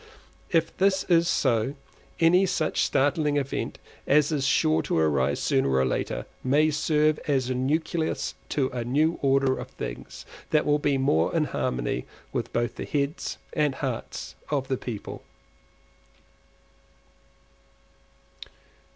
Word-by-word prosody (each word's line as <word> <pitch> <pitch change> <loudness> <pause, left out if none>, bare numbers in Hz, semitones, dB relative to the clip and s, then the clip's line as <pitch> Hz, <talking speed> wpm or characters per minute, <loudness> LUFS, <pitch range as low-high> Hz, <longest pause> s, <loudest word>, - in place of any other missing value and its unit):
If 165 -2 +1
this 190 0 +3
is 170 -1 +4
so, 130 -4 +1 0.4
any 180 +4 +5
such 160 -4 0
startling 145 +2 +1
event 140 -1 -2 0.3
as 150 +2 +4
is 140 -3 0
sure 80 - +3
to - - -1
arise 75 -5 +2
sooner - - +1
or 65 0 +2
later, 65 - -2 0.2
may 150 +4 +3
serve 150 0 +2
as 130 -3 +1
nucleus 160 +6 -1 0.2
to 135 -3 0
a 120 -2 -4
new 150 +7 +1
order 135 -1 +3
of - - -6
things - - -7 0.2
that 150 - +2
will 150 0 +3
be 145 -2 +1
more 85 - +2
in 160 - +3
harmony 60 - -2 0.3
with - - -2
both 120 0 -1
the - - -4
heads 145 +2 -2 0.2
and 150 -3 +1
hearts 130 -5 -4 0.2
of 140 -2 -1
the 130 - 0
people. 115 -5 -6
140 Hz, 130 wpm, -26 LUFS, 125-155 Hz, 0.4 s, any